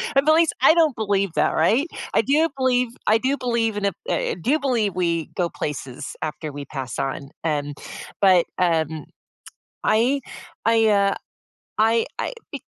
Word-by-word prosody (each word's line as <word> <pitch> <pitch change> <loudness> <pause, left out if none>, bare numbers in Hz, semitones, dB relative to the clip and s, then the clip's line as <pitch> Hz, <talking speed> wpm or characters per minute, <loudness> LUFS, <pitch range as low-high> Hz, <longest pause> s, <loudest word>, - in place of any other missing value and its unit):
And 275 - +4
beliefs 320 +1 +4
I - - +7
don't 320 -5 +3
believe 200 -4 0
that, - - +2
right? 230 - +2 0.3
I - - +5
do 300 +7 +2
believe 250 -1 +2 0.2
I 215 - +4
do 265 +4 0
believe 235 -4 0
in 205 - -1
a 200 - +2 0.2
eh - - -1
do 275 - +2
believe 235 -8 0
we 170 -3 0
go 175 -2 0
places 140 -1 -6
after 155 0 -4
we 145 0 -7
pass 135 -2 -6
on, 135 0 -3
um, 145 -2 -1 0.5
but, 185 -3 +5
um, 160 -4 0 0.8
I 255 +6 +2 0.4
I, 225 -1 +4
uh, 200 -1 +3 0.6
I 225 +1 +3
I - - -2 0.2
be - - -6
205 Hz, 160 wpm, -22 LUFS, 160-250 Hz, 0.8 s, I